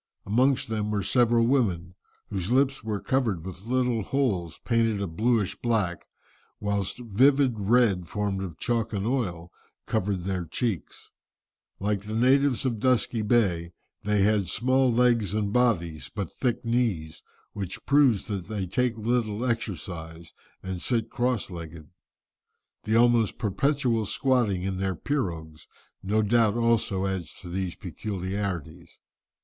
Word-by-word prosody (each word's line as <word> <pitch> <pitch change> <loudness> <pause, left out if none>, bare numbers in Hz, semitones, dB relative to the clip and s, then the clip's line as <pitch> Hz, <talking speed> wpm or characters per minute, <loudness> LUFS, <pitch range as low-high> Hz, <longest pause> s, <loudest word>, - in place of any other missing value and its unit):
Amongst 130 +6 +2
them 105 -1 -2
were 105 -2 -1
several 120 +2 +3
women, 95 -10 +1 0.4
whose 95 -1 -2
lips 135 0 +2
were 110 -2 -2
covered 110 -11 0
with 95 +2 -9
little 125 -2 +1
holes, 100 - -1
painted 115 -3 +2
a 100 - -1
blueish 105 +4 0
black, 105 -8 -1 0.5
whilst 100 -2 -2
vivid 130 +4 +3
red 100 -4 +3
formed 100 -1 -2
of 90 -5 -6
chalk 115 -2 -1
and 100 -1 -2
oil, 95 -9 -2 0.3
covered 95 -1 -1
their 90 -1 -2
cheeks. 95 - -4 0.7
Like 100 0 0
the 105 +2 -6
natives 135 +2 +3
of 120 -4 -1
Dusky 125 -2 +1
Bay, 95 -7 +1 0.3
they 105 -1 +2
had 105 -2 +2
small 130 +1 +2
legs 115 -4 +2
and 105 -1 -1
bodies, 85 -11 +1
but 100 -5 -5
thick 120 -2 -2
knees, 115 -10 -1 0.3
which 95 -3 -6
proves 140 -7 +4
that 100 -5 -4
they 105 -3 -3
take 120 +5 0
little 115 0 0
exercise 85 -8 -4 0.3
and 95 -2 -4
sit 115 -3 -1
cross 120 -5 -1
legged. 85 -3 -9 0.9
The 110 +1 +1
almost 120 -2 +4
perpetual 120 +1 0
squatting 120 -8 +1
in 95 -1 -2
their 95 -1 -1
pirogues 80 - -3 0.3
no 105 +3 +1
doubt 110 0 +3
also 115 -5 +1
adds 90 -5 -3
to 90 - -9
these 90 0 -3
peculiarities. 95 -3 -5
105 Hz, 135 wpm, -26 LUFS, 95-120 Hz, 0.9 s, proves